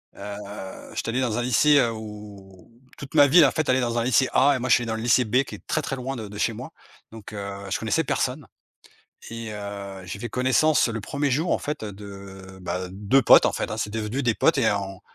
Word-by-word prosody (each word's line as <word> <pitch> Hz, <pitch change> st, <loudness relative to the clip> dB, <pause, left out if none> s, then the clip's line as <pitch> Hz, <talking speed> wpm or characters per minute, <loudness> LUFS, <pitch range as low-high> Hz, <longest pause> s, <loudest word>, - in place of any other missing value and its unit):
heu, 100 Hz, -1 st, -8 dB
j'étais -, -, -3 dB
allé 125 Hz, +3 st, 0 dB
dans 120 Hz, -4 st, -1 dB
un -, -, 0 dB
lycée, 130 Hz, +5 st, +4 dB
heu, 120 Hz, -3 st, +2 dB
où, 105 Hz, -4 st, -11 dB, 0.3 s
toute 140 Hz, -, -10 dB
ma 145 Hz, -2 st, +7 dB
ville, 160 Hz, +3 st, +7 dB
en 135 Hz, -, +3 dB
fait, 155 Hz, -2 st, -2 dB
allait 130 Hz, 0 st, +3 dB
dans 120 Hz, -1 st, -1 dB
un 115 Hz, -, +1 dB
lycée 130 Hz, +1 st, +3 dB
A 140 Hz, +2 st, +4 dB
et -, -, -2 dB
moi 130 Hz, +1 st, -3 dB
je -, -, +7 dB
suis 120 Hz, -, 0 dB
allé -, -, -6 dB
dans 110 Hz, -, -2 dB
le 110 Hz, -, -5 dB
lycée 120 Hz, +2 st, +3 dB
B, 125 Hz, +5 st, +2 dB
qui -, -, -9 dB
est -, -, -17 dB
très, 155 Hz, -, 0 dB
très 135 Hz, -, -4 dB
loin 130 Hz, +1 st, -4 dB
de 110 Hz, -4 st, -6 dB
de 105 Hz, -, -9 dB
chez 115 Hz, -, 0 dB
moi, 125 Hz, +8 st, -8 dB, 0.4 s
donc, 110 Hz, -1 st, -11 dB
heu, 100 Hz, -1 st, -5 dB
je 95 Hz, -, 0 dB
connaissais 110 Hz, +9 st, 0 dB
personne, 135 Hz, 0 st, -2 dB, 0.8 s
et 115 Hz, -1 st, -6 dB
heu, 100 Hz, -2 st, -7 dB
j'ai 95 Hz, +2 st, -7 dB
fait 120 Hz, -, -5 dB
connaissance 130 Hz, +4 st, +2 dB
le 115 Hz, -1 st, -4 dB
1er 140 Hz, +5 st, -2 dB
jour, 160 Hz, +7 st, 0 dB
en -, -, +3 dB
fait, 150 Hz, -4 st, -4 dB
de, 100 Hz, -2 st, -10 dB
bah, 90 Hz, +1 st, -3 dB
2 105 Hz, +8 st, +2 dB
potes, -, -, +7 dB
en -, -, +2 dB
fait, -, -, -3 dB
hein, 110 Hz, -, -4 dB
c'est 105 Hz, -, -2 dB
devenu 110 Hz, +5 st, -3 dB
des 115 Hz, -3 st, +1 dB
potes 165 Hz, -, +3 dB
et 120 Hz, -5 st, +3 dB
en 95 Hz, -2 st, -4 dB
115 Hz, 255 wpm, -24 LUFS, 100-130 Hz, 0.8 s, ma